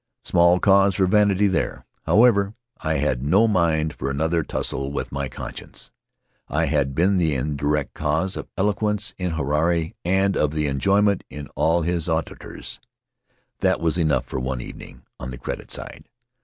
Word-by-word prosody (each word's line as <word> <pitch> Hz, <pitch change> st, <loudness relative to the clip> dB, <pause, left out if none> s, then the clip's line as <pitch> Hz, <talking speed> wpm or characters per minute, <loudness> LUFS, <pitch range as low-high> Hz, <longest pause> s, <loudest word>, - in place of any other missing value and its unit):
Small 85 Hz, +1 st, +4 dB
cause 100 Hz, 0 st, +4 dB
for 95 Hz, -, +3 dB
vanity 105 Hz, 0 st, +3 dB
there. 95 Hz, -5 st, -1 dB, 0.2 s
However, 105 Hz, -3 st, +4 dB, 0.2 s
I 80 Hz, 0 st, -1 dB
had 70 Hz, -3 st, 0 dB
no 95 Hz, +11 st, +4 dB
mind 80 Hz, -6 st, +1 dB
for 70 Hz, -, -4 dB
another 80 Hz, +4 st, 0 dB
tussle 70 Hz, -2 st, -3 dB
with 70 Hz, -, -4 dB
my 70 Hz, -1 st, -3 dB
conscience. -, -, -9 dB, 0.6 s
I 80 Hz, +3 st, 0 dB
had 70 Hz, -3 st, 0 dB
been 95 Hz, +4 st, +3 dB
the 80 Hz, -4 st, +1 dB
indirect 75 Hz, +2 st, -1 dB
cause 80 Hz, +6 st, -1 dB
of -, -, -6 dB
eloquence 105 Hz, +1 st, 0 dB
in 90 Hz, -2 st, -2 dB
Huirai 80 Hz, +3 st, 0 dB
and 95 Hz, +2 st, +2 dB
of 75 Hz, +1 st, 0 dB
enjoyment 95 Hz, +8 st, +2 dB
in 70 Hz, +1 st, -8 dB, 0.3 s
his 85 Hz, 0 st, -1 dB
auditors. 80 Hz, -1 st, -4 dB, 0.8 s
That -, -, +2 dB
was 85 Hz, +1 st, 0 dB
enough 75 Hz, -6 st, +1 dB
for -, -, -4 dB
one 65 Hz, 0 st, -3 dB
evening -, -, -10 dB, 0.2 s
on 65 Hz, -, -6 dB
the 65 Hz, -, -7 dB
credit -, -, -6 dB
side. -, -, -8 dB
80 Hz, 155 wpm, -23 LUFS, 70-95 Hz, 0.8 s, Small